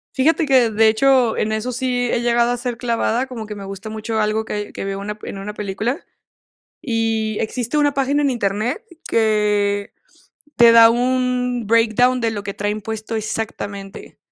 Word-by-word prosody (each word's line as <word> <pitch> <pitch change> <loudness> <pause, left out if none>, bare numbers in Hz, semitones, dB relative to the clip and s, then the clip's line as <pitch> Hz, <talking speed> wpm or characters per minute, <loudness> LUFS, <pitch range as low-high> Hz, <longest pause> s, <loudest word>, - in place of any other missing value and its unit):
Fíjate 310 +4 +2
que 255 -4 +4
de 220 +1 +3
hecho 245 +1 +3
en 215 - -1
eso 220 +3 -2
sí 245 0 -1
he 235 - 0
llegado 240 0 +2
a 245 - 0
ser 245 -1 -4
clavada, 235 +1 0
como 235 -4 -7
que 210 - -7
me 200 -1 -8
gusta 195 +2 -7
mucho 220 +1 -4
algo 215 +1 0
que - - -5
hay 210 0 -4
que - - -6
veo 195 0 -3
una 210 +1 -6
en 195 - -6
una 205 +2 -6
película, 210 - -3 0.8
y 225 -3 -1
existe 245 +5 -2
una 290 -1 +2
página 275 +2 +1
en 285 - +2
Internet 235 - -1 0.2
que 210 -2 +1 0.6
te 235 -1 +7
da 230 0 +8
un 250 -1 0
breakdown 230 +3 +3
de 225 -1 0
lo 205 -2 -4
que 200 - -4
traen 205 +1 -3
puesto 220 +1 -4
exactamente, 205 -2 -5
225 Hz, 180 wpm, -20 LUFS, 210-250 Hz, 0.8 s, da